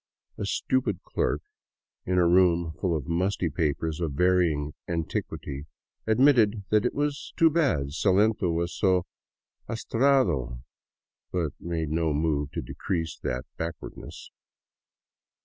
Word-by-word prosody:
A -, -, -2 dB
stupid 125 Hz, -8 st, 0 dB
clerk -, -, -1 dB, 0.6 s
in 90 Hz, 0 st, +1 dB
a 90 Hz, -1 st, +5 dB
room 85 Hz, -2 st, +4 dB
full 85 Hz, -4 st, +1 dB
of 70 Hz, -, -6 dB
musty 90 Hz, 0 st, 0 dB
papers 80 Hz, +1 st, -1 dB
of 80 Hz, -4 st, -1 dB
varying 80 Hz, -3 st, +2 dB
antiquity 80 Hz, -3 st, -4 dB, 0.4 s
admitted 110 Hz, -3 st, +4 dB
it 110 Hz, +3 st, +2 dB
was 145 Hz, 0 st, -2 dB
too 165 Hz, -1 st, +5 dB
bad 135 Hz, -, +1 dB
Salento 100 Hz, +2 st, +2 dB
was 85 Hz, +1 st, -1 dB
so 95 Hz, -3 st, +2 dB, 0.6 s
atrasado, 110 Hz, -, +1 dB, 0.7 s
but 85 Hz, -5 st, -1 dB
made 80 Hz, -3 st, -3 dB
no 80 Hz, -1 st, +1 dB
move 75 Hz, -1 st, 0 dB
to -, -, -3 dB
decrease 80 Hz, -3 st, -3 dB
that 65 Hz, +2 st, -3 dB
backwardness. 80 Hz, 0 st, -7 dB
85 Hz, 115 wpm, -27 LUFS, 80-105 Hz, 0.7 s, a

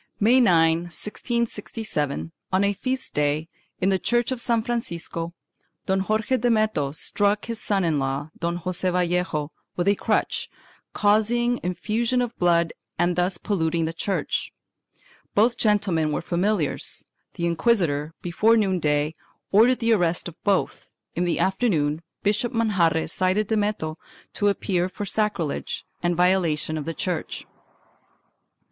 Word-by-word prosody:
May 235 Hz, +5 st, +5 dB
9, 165 Hz, -6 st, +5 dB
1667, 210 Hz, -, -3 dB, 0.2 s
on 190 Hz, +1 st, +3 dB
a 200 Hz, 0 st, +2 dB
feast 255 Hz, +5 st, -3 dB
day, 150 Hz, +2 st, 0 dB, 0.3 s
in 190 Hz, -, +2 dB
the 190 Hz, -1 st, +2 dB
church 240 Hz, +4 st, +1 dB
of 255 Hz, -2 st, -2 dB
San 230 Hz, -2 st, +1 dB
Francisco, 170 Hz, -7 st, -3 dB, 0.5 s
Don 190 Hz, 0 st, +1 dB
Jorje 220 Hz, +4 st, +1 dB
Dame 225 Hz, -3 st, +3 dB
to 140 Hz, -1 st, -1 dB
struck 205 Hz, +6 st, 0 dB
his 230 Hz, -1 st, -4 dB
son 195 Hz, -2 st, +1 dB
in 160 Hz, -4 st, +1 dB
law, 135 Hz, +3 st, -2 dB
Don 170 Hz, 0 st, -2 dB
Joseph 185 Hz, 0 st, 0 dB
Vallejo, 175 Hz, -4 st, 0 dB, 0.2 s
with 175 Hz, +1 st, -1 dB
a 200 Hz, -, +6 dB
crutch, -, -, 0 dB, 0.4 s
causing 235 Hz, +4 st, +2 dB
effusion 220 Hz, +7 st, 0 dB
of 245 Hz, -1 st, -1 dB
blood 170 Hz, -2 st, +3 dB, 0.2 s
and 175 Hz, +1 st, +2 dB
thus 180 Hz, +1 st, +1 dB
polluting 165 Hz, -4 st, 0 dB
the 160 Hz, -, -3 dB
church. 190 Hz, +3 st, -2 dB, 0.8 s
Both 230 Hz, +4 st, +4 dB
gentlemen 195 Hz, -8 st, +1 dB
were -, -, -2 dB
familiars. 180 Hz, -2 st, 0 dB, 0.3 s
The 170 Hz, -, -2 dB
inquisitor, 165 Hz, -4 st, +1 dB
before 215 Hz, +6 st, +3 dB
noon 190 Hz, -4 st, +1 dB
day, 150 Hz, 0 st, +1 dB, 0.4 s
ordered 235 Hz, +5 st, +5 dB
the 230 Hz, -1 st, +2 dB
arrest 175 Hz, -5 st, +1 dB
of 170 Hz, -, -11 dB
both; 200 Hz, -2 st, 0 dB, 0.2 s
in 175 Hz, -, 0 dB
the 175 Hz, -, 0 dB
afternoon 170 Hz, -7 st, +1 dB, 0.2 s
Bishop 215 Hz, +4 st, +1 dB
Manjarre 190 Hz, -9 st, +2 dB
cited 185 Hz, +5 st, 0 dB
Dameto 205 Hz, -7 st, -1 dB, 0.4 s
to 205 Hz, -, +1 dB
appear 185 Hz, -3 st, 0 dB
for 205 Hz, -, -5 dB
sacrilege 200 Hz, -7 st, -2 dB, 0.2 s
and 175 Hz, 0 st, +1 dB
violation 175 Hz, -4 st, +2 dB
of 145 Hz, -, -5 dB
the 165 Hz, 0 st, -4 dB
church. 180 Hz, -4 st, -3 dB
185 Hz, 140 wpm, -24 LUFS, 165-215 Hz, 0.8 s, a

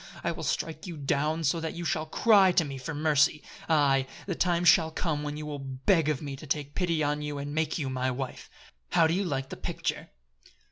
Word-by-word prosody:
I -, -, 0 dB
will -, -, -6 dB
strike 160 Hz, +2 st, -3 dB
you 170 Hz, -3 st, -6 dB
down 150 Hz, +3 st, 0 dB
so 160 Hz, +3 st, +1 dB
that 160 Hz, -1 st, -4 dB
you 170 Hz, 0 st, -5 dB
shall 160 Hz, -4 st, -1 dB
cry 200 Hz, +1 st, +5 dB
to 170 Hz, -2 st, +3 dB
me 135 Hz, -2 st, -6 dB
for 145 Hz, +4 st, -5 dB
mercy! 150 Hz, 0 st, +2 dB, 0.3 s
Aye, 140 Hz, -4 st, +3 dB, 0.2 s
the 190 Hz, -, -2 dB
time 175 Hz, 0 st, +1 dB
shall 160 Hz, -1 st, +6 dB
come 160 Hz, -2 st, -2 dB
when 150 Hz, 0 st, -4 dB
you 150 Hz, -, -6 dB
will 145 Hz, -1 st, -5 dB
beg 135 Hz, +5 st, +1 dB
of 150 Hz, -1 st, -1 dB
me 140 Hz, -2 st, -5 dB
to -, -, -11 dB
take 145 Hz, -1 st, -2 dB
pity 170 Hz, -4 st, 0 dB
on 150 Hz, +1 st, 0 dB
you 150 Hz, -1 st, -4 dB
and 145 Hz, +1 st, -5 dB
make 160 Hz, +1 st, 0 dB
you 145 Hz, -5 st, -2 dB
my 130 Hz, 0 st, -1 dB
wife! 130 Hz, 0 st, -5 dB, 0.4 s
How 165 Hz, -, +5 dB
do 160 Hz, -, +2 dB
you 195 Hz, +3 st, +1 dB
like 135 Hz, -6 st, -2 dB
the -, -, -7 dB
picture?" -, -, -3 dB
150 Hz, 230 wpm, -28 LUFS, 140-165 Hz, 0.4 s, shall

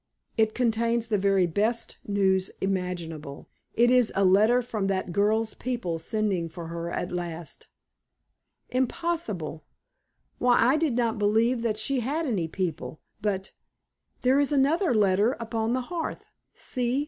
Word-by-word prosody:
It 220 Hz, -1 st, +2 dB
contains 235 Hz, -1 st, +1 dB
the 210 Hz, -3 st, +2 dB
very 195 Hz, -1 st, +3 dB
best 215 Hz, +7 st, -1 dB
news 190 Hz, -2 st, +2 dB
imaginable. 175 Hz, -6 st, -4 dB, 0.3 s
It 240 Hz, +2 st, +4 dB
is 250 Hz, -3 st, +4 dB
a 195 Hz, -, +3 dB
letter 215 Hz, +7 st, +5 dB
from 215 Hz, -4 st, -2 dB
that 190 Hz, -2 st, -1 dB
girl's 215 Hz, +4 st, +1 dB
people 235 Hz, -10 st, -3 dB
sending 190 Hz, -2 st, -1 dB
for 165 Hz, 0 st, -8 dB
her 170 Hz, 0 st, -4 dB
at 175 Hz, -, -3 dB
last." 170 Hz, -2 st, -6 dB, 1.0 s
"Impossible! 250 Hz, -, -2 dB, 0.8 s
Why, 245 Hz, -1 st, +4 dB
I 250 Hz, +5 st, +5 dB
did 310 Hz, -4 st, +1 dB
not 235 Hz, -2 st, 0 dB
believe 225 Hz, +4 st, +2 dB
that 225 Hz, -2 st, -1 dB
she 255 Hz, +5 st, 0 dB
had 290 Hz, +7 st, -1 dB
any 200 Hz, -, -1 dB
people. 165 Hz, -2 st, -4 dB, 0.2 s
But 195 Hz, -2 st, -2 dB, 0.7 s
there 260 Hz, +2 st, +4 dB
is 285 Hz, 0 st, +2 dB
another 290 Hz, -, +2 dB
letter 205 Hz, +3 st, +3 dB
upon 230 Hz, 0 st, -1 dB
the 255 Hz, -, 0 dB
hearth. 330 Hz, +5 st, -5 dB, 0.3 s
See! 250 Hz, +1 st, -1 dB
215 Hz, 140 wpm, -27 LUFS, 185-245 Hz, 1.0 s, letter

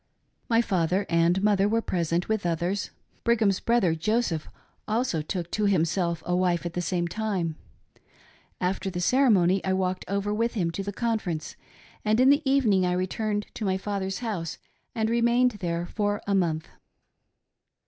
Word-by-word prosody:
My 230 Hz, 0 st, +4 dB
father 185 Hz, 0 st, +1 dB
and 170 Hz, +3 st, +2 dB
mother 205 Hz, -1 st, +3 dB
were 225 Hz, +1 st, +2 dB
present, 170 Hz, 0 st, -1 dB
with 220 Hz, -2 st, 0 dB
others. 175 Hz, +3 st, -1 dB, 0.3 s
Brigham's 220 Hz, -5 st, +2 dB
brother 230 Hz, -8 st, +2 dB
Joseph 170 Hz, -1 st, -1 dB, 0.4 s
also 220 Hz, -7 st, 0 dB
took 175 Hz, +2 st, -4 dB
to 215 Hz, -, 0 dB
himself 170 Hz, -2 st, +1 dB
a 180 Hz, -, 0 dB
wife 180 Hz, -1 st, +1 dB
at 170 Hz, -, -3 dB
the 175 Hz, -, -2 dB
same 175 Hz, -1 st, -1 dB
time. 180 Hz, -4 st, -2 dB, 1.0 s
After 190 Hz, +1 st, -1 dB
the 175 Hz, -1 st, -4 dB
ceremony 195 Hz, -5 st, +3 dB
I 190 Hz, -, 0 dB
walked 185 Hz, -1 st, -1 dB
over 200 Hz, +2 st, -1 dB
with 230 Hz, +3 st, 0 dB
him 170 Hz, -5 st, 0 dB
to 180 Hz, -, -4 dB
the 200 Hz, +1 st, -4 dB
conference, 205 Hz, -8 st, -2 dB, 0.5 s
and 215 Hz, +2 st, +2 dB
in 260 Hz, +2 st, +6 dB
the 285 Hz, +2 st, +4 dB
evening 225 Hz, -9 st, +3 dB
I 180 Hz, 0 st, +1 dB
returned 205 Hz, +3 st, -1 dB
to -, -, -6 dB
my 190 Hz, -2 st, +1 dB
father's 195 Hz, -1 st, -3 dB
house 175 Hz, -7 st, -3 dB, 0.4 s
and 220 Hz, -1 st, +1 dB
remained 235 Hz, +2 st, +3 dB
there 170 Hz, -1 st, -2 dB
for 205 Hz, +2 st, -1 dB
n 200 Hz, -1 st, +3 dB
month. 160 Hz, -3 st, -1 dB
190 Hz, 160 wpm, -26 LUFS, 175-215 Hz, 1.0 s, in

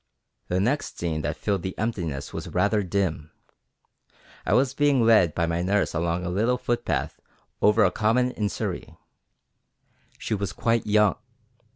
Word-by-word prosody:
The 90 Hz, -, 0 dB
next 125 Hz, +9 st, -1 dB
scene 80 Hz, -3 st, -2 dB
that 75 Hz, +1 st, -3 dB
filled 100 Hz, -3 st, -1 dB
the 95 Hz, +1 st, -5 dB
emptiness 85 Hz, -11 st, -3 dB
was -, -, -5 dB
rather 105 Hz, +1 st, +1 dB
dim: 90 Hz, -5 st, -2 dB, 1.2 s
I -, -, +2 dB
was 130 Hz, +1 st, +2 dB
being 140 Hz, -3 st, +3 dB
led 105 Hz, -8 st, +4 dB
by 85 Hz, -, +1 dB
my 85 Hz, +1 st, -1 dB
nurse 100 Hz, +3 st, +1 dB
along 85 Hz, +2 st, -1 dB
a -, -, -2 dB
little 115 Hz, +7 st, +1 dB
footpath 120 Hz, -1 st, -2 dB, 0.4 s
over 105 Hz, +1 st, +5 dB
a 90 Hz, -, +2 dB
common 120 Hz, +4 st, +1 dB
in 105 Hz, -4 st, -2 dB
Surrey. -, -, -5 dB, 1.2 s
She -, -, -4 dB
was 100 Hz, -3 st, -2 dB
quite 115 Hz, -2 st, 0 dB
young. 105 Hz, -1 st, +3 dB
100 Hz, 155 wpm, -25 LUFS, 85-115 Hz, 1.2 s, over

